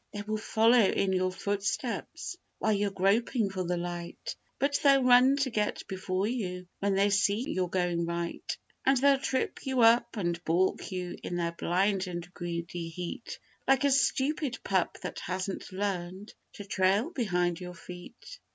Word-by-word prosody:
They 205 -1 -4
will 215 +1 -2
follow 225 +3 +4
in 190 0 +2
your 185 0 +1
footsteps 200 - -3 0.2
while 220 - +1
you're 205 0 +1
groping 200 +3 +1
for 185 -1 -2
the 175 0 -1
light; 175 0 -5 0.2
But 280 +1 +1
they'll 275 -2 +5
run 250 +2 +6
to 280 -2 0
get 210 -2 -1
before 190 0 -2
you 185 -6 -3
when 200 -1 +1
they 200 +1 +3
see 200 +5 +2
you're 185 -1 -1
going 175 -2 0
right; 170 0 -3 0.3
And 270 0 +4
they'll 275 +1 +4
trip 265 -1 -2
you 260 -2 0
up 235 +1 +5
and 175 -3 -2
baulk 180 +5 +1
you 180 -1 -4
in 175 - -4
their 170 -1 0
blind 190 +3 0
and 175 0 -6
greedy 170 -1 -4
heat, 175 +7 -6 0.3
Like 270 0 +4
a 280 - +4
stupid 275 -1 +1
pup 190 -3 0
that - - -5
hasn't 185 +2 -4
learned 190 0 -3 0.2
to 205 - -9
trail 200 - +2
behind 180 - 0
your 180 -1 -7
feet. 180 - -11
195 Hz, 165 wpm, -29 LUFS, 180-235 Hz, 0.3 s, run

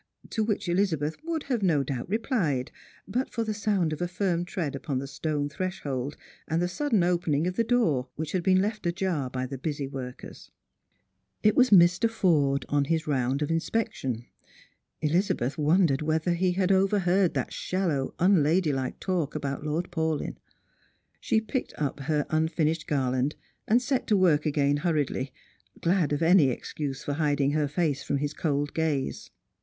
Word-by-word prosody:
To 220 - 0
which 210 -3 -1
Eliza 175 -1 +2
beth 150 +2 -3
would 325 -2 -2
have 250 -5 -1
no 160 -7 +3
doubt 130 +2 -4
replied, 195 - 0 0.4
but 250 +7 -1
for 230 - -2
the 220 -1 -2
sound 200 -6 0
of 155 - -6
a 175 - +1
firm 175 -1 -1
tread 160 -6 -3
upon 140 0 -3
the 135 - -3
stone 145 +1 -2
threshold, 145 -5 -4 0.3
and 160 - 0
the 175 - +1
sudden 220 0 +1
opening 170 -4 +1
of 180 0 -2
the 230 - +2
door, 215 - +1
which 155 0 -4
had 185 - 0
been 185 +1 +4
left 215 -3 -2
ajar 170 -6 -1
by 130 0 -3
the 130 0 -6
busy 145 -1 -3
workers. 130 -2 -8 0.9
It 215 - +4
was 255 0 +5
Mr. 180 +3 +6
Forde 150 -11 +2
on 145 -1 +1
his 160 +1 0
round 135 0 0
of 150 - -2
inspection. 160 - -2 0.8
Elizabeth 155 - +1
won 165 +6 +4
dered 135 -1 0
whether 160 +3 +1
he 180 +1 +1
had 185 +1 +1
overheard 190 -1 +3
that - - -2
shallow 170 -8 -1
unlaihdike 160 -6 +2
talk 175 -7 -1
about 140 -1 -3
Lord 160 +4 -2
Paul}^. 160 -3 -1 0.8
She 220 - +2
picked 225 +4 -4
up 145 -1 -2
her 150 +1 0
unfinished 160 0 0
garland, 130 0 0 0.3
and 230 +3 +5
set 260 +1 -1
to 210 - +3
work 160 -5 +3
again 145 -1 +2
hurriedly, 145 -5 -1 0.5
glad 175 -3 +1
of 145 +2 0
any 165 -4 +6
excuse 135 +2 -4
for 145 - -2
hiding 145 -2 +1
her 150 0 +1
face 145 -2 0
from 140 - -1
his 145 +1 -2
cold 145 -2 -1
gaze. 155 -4 -1
160 Hz, 170 wpm, -27 LUFS, 145-185 Hz, 0.9 s, Mr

